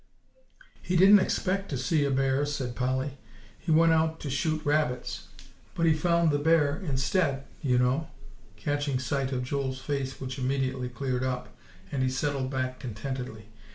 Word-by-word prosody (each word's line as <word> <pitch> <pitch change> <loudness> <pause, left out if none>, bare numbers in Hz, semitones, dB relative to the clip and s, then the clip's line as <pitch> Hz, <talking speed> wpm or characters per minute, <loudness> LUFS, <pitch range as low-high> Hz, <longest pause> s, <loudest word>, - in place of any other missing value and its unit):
"He 180 - -2
didn't 195 +3 +8
expect 195 +1 0
to 140 - -2
see 145 +3 +1
a - - +1
bear," 135 +1 +2
said 130 -4 -3
Polly; 130 +2 -1 0.4
"he - - -8
went 165 +1 +5
out 160 0 +1
to 140 - -4
shoot 155 +3 -1
rabbits. 145 -4 0 0.5
But 170 - +1
he 160 - +5
found 170 +1 +2
the 145 - +1
bear 150 -1 +3
instead, 140 -1 0 0.2
you 125 -3 +2
know," 130 +6 +1 0.5
catching 145 +1 -1
sight 130 +1 -1
of 125 -1 -1
Joel's 130 0 -2
face, 135 -2 -3
which 130 0 -5
immediately 130 -1 -1
cleared 130 0 -2
up, 125 -5 -3 0.4
and 140 - -1
he 130 - +2
settled 135 0 -1
back 130 -1 -2
contentedly. 120 -2 -6
135 Hz, 160 wpm, -28 LUFS, 130-155 Hz, 0.5 s, didn't